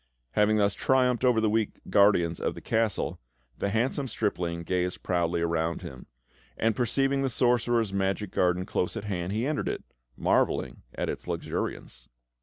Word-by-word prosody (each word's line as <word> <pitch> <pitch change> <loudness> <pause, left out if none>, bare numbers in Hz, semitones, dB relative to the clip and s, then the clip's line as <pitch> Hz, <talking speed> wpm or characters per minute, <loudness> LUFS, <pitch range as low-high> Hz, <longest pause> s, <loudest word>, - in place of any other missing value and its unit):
Having 105 - +3
thus 100 -1 +3
triumphed 125 -2 +2
over 125 -3 +4
the 110 - +2
weak 110 0 0
guardians 100 -5 +4
of - - -2
the - - -7
Castle, 110 -1 -1 0.4
the 100 - 0
handsome 125 +6 0
stripling 90 -7 -2
gazed 90 +1 -2
proudly 85 -1 0
around 85 0 -1
him; 65 - -9 0.5
and, 115 -1 +1
perceiving 135 +4 +1
the 135 - +1
sorcerer's 120 -3 +2
magic 95 +1 -1
garden 90 0 +1
close 90 +4 -1
at 110 - -4
hand, 90 -3 -3
he 110 +4 -1
entered 150 +1 -1
it, - - -4 0.3
marvelling - - +1
at - - -2
its - - -5
luxuriance. - - -4
105 Hz, 160 wpm, -28 LUFS, 90-120 Hz, 0.5 s, over